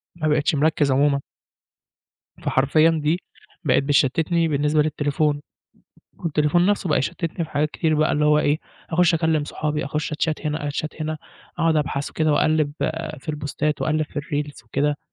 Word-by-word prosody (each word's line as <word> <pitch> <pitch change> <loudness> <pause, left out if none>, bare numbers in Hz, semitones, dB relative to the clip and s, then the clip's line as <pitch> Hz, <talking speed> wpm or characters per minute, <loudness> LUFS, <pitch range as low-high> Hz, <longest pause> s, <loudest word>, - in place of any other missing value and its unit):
ما 155 - -2
بقيتش 150 0 +2
مركِّز 145 -1 +2
عمومًا. 140 +1 +3 1.2
فحرفيًا 155 +5 +3
دي 160 +2 0 0.4
بقت 140 -2 +3
بتشتتني 155 +4 +2
بالنسبة 150 +1 +2
للتليفون. 145 0 0 0.8
والتليفون 160 +2 +2
نفسه 205 -3 +1
بقى 150 - +3
يشتتني 165 +5 -2
في 155 - -13
حاجات 150 0 0
كتير 160 0 0
بقى 155 0 +2
اللي 150 0 +1
هو 150 0 +5
إيه 150 0 +2 0.3
أخش 175 +1 +3
أكلم 160 -2 +1
صحابي 150 0 -2
أخش 150 +2 -3
أتشات 155 0 -1
هنا 150 0 -2
أتشات 155 +2 -4
هنا 155 0 -3 0.4
أقعد 165 -1 +3
أبحث 145 -1 -1
وكده 155 -1 +1
وأقلب 155 0 +2 0.5
في - - -18
البوستات 150 0 -2
وأقلب 155 0 +1
في - - -21
الريلز 145 -1 -3
وكده 145 0 0
150 Hz, 155 wpm, -23 LUFS, 145-155 Hz, 1.2 s, هو